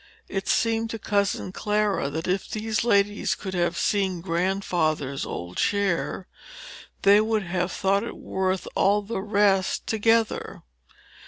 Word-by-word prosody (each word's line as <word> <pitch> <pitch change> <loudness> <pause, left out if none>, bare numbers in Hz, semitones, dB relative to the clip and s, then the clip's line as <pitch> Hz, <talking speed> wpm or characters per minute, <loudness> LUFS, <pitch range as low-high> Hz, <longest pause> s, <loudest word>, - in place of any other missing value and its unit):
It 195 -1 -4
seemed 225 0 +1
to 225 - -4
cousin 200 -3 -1
Clara 210 -6 0
that 160 +4 -4
if 185 +1 -1
these 220 0 -1
ladies 205 -3 +2
could 190 -2 -6
have 175 -1 0
seen 190 -4 0
Grandfather's 170 -6 -1
old 85 +1 -6
chair, 195 -2 0 0.8
they 200 +1 +7
would 220 -1 0
have 175 0 -2
thought 195 0 +1
it 235 - -6
worth 190 0 -2
all 205 +1 +2
the 200 -1 -4
rest 200 -2 +2
together. 225 0 +1
195 Hz, 135 wpm, -25 LUFS, 180-210 Hz, 0.8 s, they